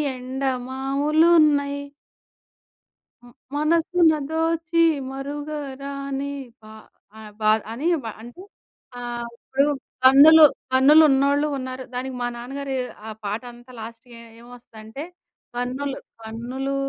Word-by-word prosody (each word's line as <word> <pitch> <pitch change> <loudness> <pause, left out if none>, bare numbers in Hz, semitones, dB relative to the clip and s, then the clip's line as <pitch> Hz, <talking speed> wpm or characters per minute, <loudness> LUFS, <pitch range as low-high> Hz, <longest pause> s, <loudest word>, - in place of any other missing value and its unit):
ఎండమావులున్నయి. 280 +4 +1 1.4
హ్మ్. 245 0 -17 0.2
మనసున 330 +2 +3 0.2
దోచి 330 +1 0 0.3
మరుగరాని 280 0 -5 0.3
పా 215 0 -13 0.5
అ - - -10 0.2
పా 215 0 +3 0.2
అని 265 +8 -4 0.2
ప - - -5 0.2
అంటే 240 +10 -12 0.6
ఆహ్, 240 -1 -5
ఇప్పుడు 270 +3 0 0.4
కన్నులు, 300 +4 +9 0.3
కన్నులు 280 +5 +7
ఉన్నోళ్ళూ 280 +2 +2
ఉన్నారు, 255 0 -6
దానికి 255 +1 -4
మా 245 - -1
నాన్నగారు 270 +3 -5 0.3
ఆ - - -5
పాటంతా 240 +4 -6
లాస్ట్‌కి 230 +2 -10
ఏ - - -12 0.2
ఏం 235 - -15
వస్తదంటే, 230 +2 -10 0.5
కన్నులు 260 +3 -3 0.2
కన్నులు 245 +5 -5
270 Hz, 100 wpm, -23 LUFS, 245-290 Hz, 1.4 s, కన్నులు